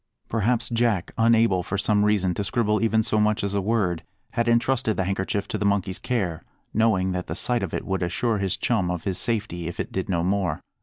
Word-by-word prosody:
Perhaps 115 +1 +1
Jack, 115 -6 +1
unable 115 -4 +4
for 95 +3 -3
some 105 +1 +2
reason 100 -4 +2
to 100 - -2
scribble 105 +2 +1
even 110 -1 +3
so 110 - +1
much 105 -1 +2
as 100 0 -1
a 100 - +1
word, 95 -5 0 0.3
had 115 0 0
entrusted 120 -1 +2
the 95 - +1
handkerchief 95 +2 -2
to - - -2
the - - -1
monkey's 100 -2 0
care, 95 -10 -2 0.3
knowing 105 -4 +2
that 90 0 -3
the 80 - -4
sight 120 +4 0
of 95 -4 -3
it - - -3
would 95 -1 -1
assure 105 +6 0
his 95 -2 -1
chum 105 -7 0
of 90 -2 -3
his 95 -2 -1
safety, 105 -7 -2
if 85 - -6
it - - -3
did 95 0 -3
no 85 -3 +1
more. 95 -1 0
100 Hz, 220 wpm, -25 LUFS, 95-115 Hz, 0.3 s, unable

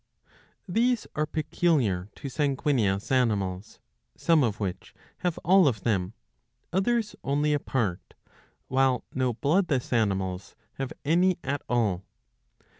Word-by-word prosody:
These 235 +5 +1
are 155 0 0
peculiar 145 - 0
to - - -7
sanguineous 135 -7 0
animals, 105 -6 0 0.4
some 165 -2 +3
of 110 -4 -1
which 95 -4 -5 0.2
have 175 -2 -1
all 185 -1 +6
of 110 -7 0
them, 95 -3 0 0.6
others 215 +3 +1
only 145 +2 +1
a 145 - +2
part, 110 -11 -2 0.5
while 130 -1 +2
no 130 -2 0
bloodless 145 - +1
animals 95 -4 -1 0.2
have 135 -1 -3
any 175 +5 +3
at 140 +1 -2
all. 105 -7 +1
130 Hz, 115 wpm, -27 LUFS, 105-155 Hz, 0.6 s, all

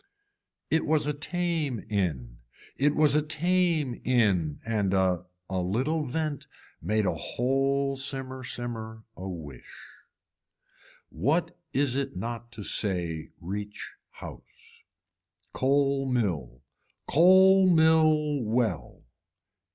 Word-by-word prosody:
It 160 - +3
was 155 -1 +2
a 150 - 0
tame 155 - -2
in, 75 - -2 0.4
it 145 +2 +2
was 150 -2 +4
a 150 - +4
tame 155 -3 0
in 100 - +2
and 105 -4 0
a 95 -2 +1 0.2
a 95 -1 -2
little 135 - -1
vent 155 +1 -3 0.3
made 105 +5 0
a - - +1
whole 135 +2 0
simmer 135 -1 -4
simmer 115 -3 -6
a 95 +1 -6
wish. 75 -8 -10 1.2
What 160 - 0 0.2
is 135 -2 +1
it 135 0 -2
not 120 0 -5
to 110 - -7
say 85 -7 -1
reach 100 +3 -6 0.2
house. - - -13 0.7
Coal 135 0 +1
mill. 85 - -2 0.4
Coal 190 +4 +6
mill 155 -3 +4
well. 110 -4 -1
130 Hz, 105 wpm, -27 LUFS, 100-150 Hz, 1.2 s, Coal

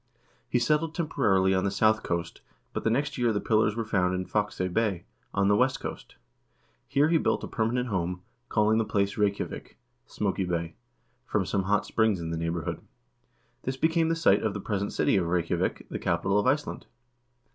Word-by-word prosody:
He - - +2
settled 155 +6 +1
temporarily 100 - +2
on 95 0 +1
the 100 - +1
south 110 +2 +3
coast, 85 -1 -3 0.3
but - - -3
the - - +2
next 140 +4 -1
year 120 -2 +3
the 105 - 0
pillars 110 -1 +2
were 115 -1 -2
found 90 -4 +1
in 90 0 -2
Fakse 105 +1 -1
Bay, 100 -6 0 0.3
on 100 0 +1
the 100 - +4
west 130 +4 +2
coast. - - -7 0.7
Here 145 +2 +3
he 165 -1 +4
built - - 0
a - - -3
per 110 - -1
manent 125 +1 -1
home, 90 -2 -2 0.3
calling 110 0 +3
the - - +2
place 100 -2 0
Reykjavik 100 -1 -2 0.3
(Smoky 95 -2 -1
Bay), 85 -2 -2 0.5
from - - 0
some 95 -2 -1
hot 105 +1 +2
springs 110 -4 +1
in 80 -1 -4
the 85 - -2
neighborhood. 85 0 -3 0.8
This 130 +1 -3
became 160 +2 +2
the 165 - +2
site 125 -12 +4
of 110 -2 -1
the - - -3
present 100 0 -2
city - - +2
of 90 -3 0
Reykjavik, 85 -1 -1
the - - -3
capital 95 +4 +1
of 105 - 0
Iceland. 145 +3 -1
105 Hz, 190 wpm, -28 LUFS, 95-120 Hz, 0.8 s, the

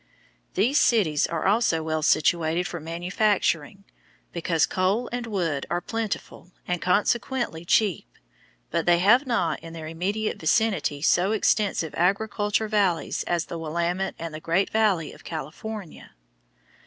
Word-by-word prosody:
These 240 +10 +3
cities 175 -11 +3
are 165 -2 -3
also 200 -6 +2
well 155 0 -1
situated 160 +2 +2
for 175 - -5
manufacturing, 175 +1 -1 0.5
because 165 -2 +1
coal 195 +6 0
and 245 -1 -3
wood 170 -10 -2
are 175 - 0
plentiful 215 -4 -5 0.2
and 180 -2 -1
consequently 205 +1 0
cheap, 190 - +2 0.6
but - - -1
they 175 0 +6
have 235 +10 +4
not 235 -2 0
in 165 0 -10
their 160 -1 -7
immediate 190 +7 -2
vicinity 160 -5 +1
so 185 +5 +3
extensive 205 -6 +1
agricultural 205 +3 0
valleys 195 -6 +1
as 175 -1 0
the 170 - -6
Willamette 170 +4 -2
and 165 -1 -6
the 155 - -6
Great 170 +5 0
Valley 205 -8 +1
of - - -16
California. 165 - -7
180 Hz, 135 wpm, -25 LUFS, 165-215 Hz, 0.6 s, they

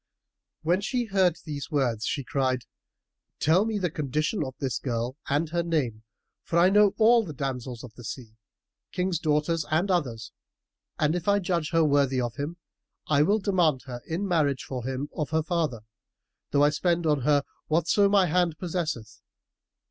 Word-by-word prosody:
'" - - -61
When 175 +4 +2
she 245 +3 -1
heard 190 -5 +2
these 145 -3 -5
words, 125 -7 0
she 140 - -2
cried, 130 -2 0 0.8
"Tell 175 +7 +3
me 220 -1 -1
the 180 -5 -1
condition 155 - -1
of 130 -2 -6
this 135 -4 -2
girl, 120 0 -2
and 145 +4 +1
her 170 +1 0
name 145 -10 -1 0.4
for 170 - -2
I 180 +2 +5
know 205 -1 +5
all 230 +1 +5
the 155 -7 -8
damsels 125 -3 -4
of 120 -3 -10
the 120 - -12
sea, 115 -1 -7 0.6
Kings' 180 -2 -1
daughters 155 +1 +1
and 170 +6 +1
others; 120 - -1 0.7
and, 150 +1 +2
if 175 0 -3
I 200 0 +4
judge 175 -5 -1
her 165 -1 +3
worthy 140 -3 +2
of 120 -2 -3
him, 150 +5 -4 0.5
I 145 -2 +4
will 200 +8 +3
demand 175 -9 +1
her 125 -2 -7
in 180 +5 -2
marriage 150 -7 +1
for 125 -3 -5
him 135 +2 -3
of 150 - -2
her 160 0 +1
father, 155 -9 -1 0.7
though 145 0 +3
I 145 - +5
spend 170 +2 0
on 150 -3 +2
her 145 +2 +3 0.2
whatso 170 +6 +3
my 200 -2 +4
hand 175 -1 +1
possesseth. 155 - -4
155 Hz, 180 wpm, -27 LUFS, 135-175 Hz, 0.8 s, I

